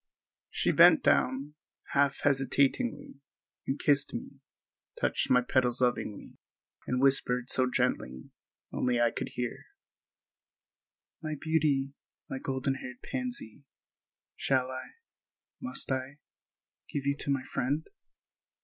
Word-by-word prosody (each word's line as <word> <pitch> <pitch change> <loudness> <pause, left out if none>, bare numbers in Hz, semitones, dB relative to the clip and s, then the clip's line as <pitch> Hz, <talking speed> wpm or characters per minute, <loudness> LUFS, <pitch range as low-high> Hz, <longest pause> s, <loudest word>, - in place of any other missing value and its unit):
She - - +1
bent - - +7
down, 135 +3 +2 0.4
half 140 -1 +2
hesitatingly, 140 - +1 0.5
and 135 - 0
kissed 145 -2 +2
me, - - -7 0.6
touched - - +1
my 125 - +5
petals 125 -1 +1
lovingly, 120 -4 -1 0.5
and 125 - 0
whispered 125 -2 +2
so 130 -1 +2
gently—only 120 - -2
I 120 -1 +4
could 130 - -5
hear: 125 -2 -4 1.5
"My 155 -1 -3
beauty, 145 -4 +1 0.3
my 135 - -4
golden 135 0 -1
hearted 125 -1 -9
pansy, 240 - -4 0.7
shall 130 -1 +1
I—must 270 - -8
I—give 135 +1 -7
you 140 0 +2
to - - -4
my 135 -2 +1
friend?" 140 +4 -1
135 Hz, 105 wpm, -30 LUFS, 125-145 Hz, 1.5 s, bent